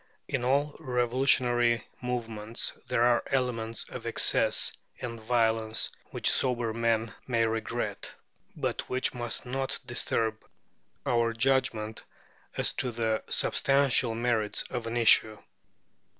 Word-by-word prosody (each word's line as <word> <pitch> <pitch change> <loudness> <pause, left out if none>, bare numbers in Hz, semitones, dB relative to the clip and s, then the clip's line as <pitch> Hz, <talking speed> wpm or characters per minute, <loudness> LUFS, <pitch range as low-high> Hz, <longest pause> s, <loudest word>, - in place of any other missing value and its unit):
In 130 - -2
all 140 +4 +1
revolutionary 120 -1 +2 0.2
movements 115 -3 -2
there 115 - +2
are 120 0 +4
elements 115 -4 -1
of - - -7
excess - - +3 0.2
and 115 -2 -6
violence, 110 -1 +1
which - - +1
sober 120 -3 +2
men 115 0 0
may 115 -3 +2
regret, 110 0 -3 0.4
but - - -3
which 130 0 0
must 120 -1 -4
not 135 +2 -2
disturb 110 -2 -1 0.6
our 115 -1 +2
judgment 115 -3 0 0.5
as - - +2
to 130 - -1
the 110 -1 -1
substantial 135 -4 +2
merits 115 -3 0
of 120 -2 -3
an 115 +1 -2
issue. 110 -2 +5
120 Hz, 115 wpm, -29 LUFS, 115-125 Hz, 0.6 s, issue